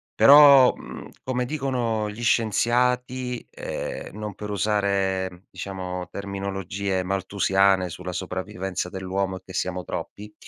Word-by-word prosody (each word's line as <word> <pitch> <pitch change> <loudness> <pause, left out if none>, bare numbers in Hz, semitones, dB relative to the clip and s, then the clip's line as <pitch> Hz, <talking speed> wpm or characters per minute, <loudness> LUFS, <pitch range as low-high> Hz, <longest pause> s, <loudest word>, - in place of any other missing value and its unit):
però, 140 -2 +8
mhmm, - - -10
come 125 -1 -1
dicono 120 -7 -1
gli 110 +3 -8
scienziati, 125 +2 +1
ehm, 105 - -6
non 105 -2 -5
per 105 0 -7
usare 95 -3 0
diciamo 90 -2 -5
terminologie 100 -1 -3
malthusiane 95 0 +2
sulla 90 +2 -6
sopravvivenza 95 0 -4
dell'uomo 95 0 -3
e - - -13
che 95 - -11
siamo 90 -1 -2
troppi, 105 +1 -7
100 Hz, 115 wpm, -24 LUFS, 95-115 Hz, -, però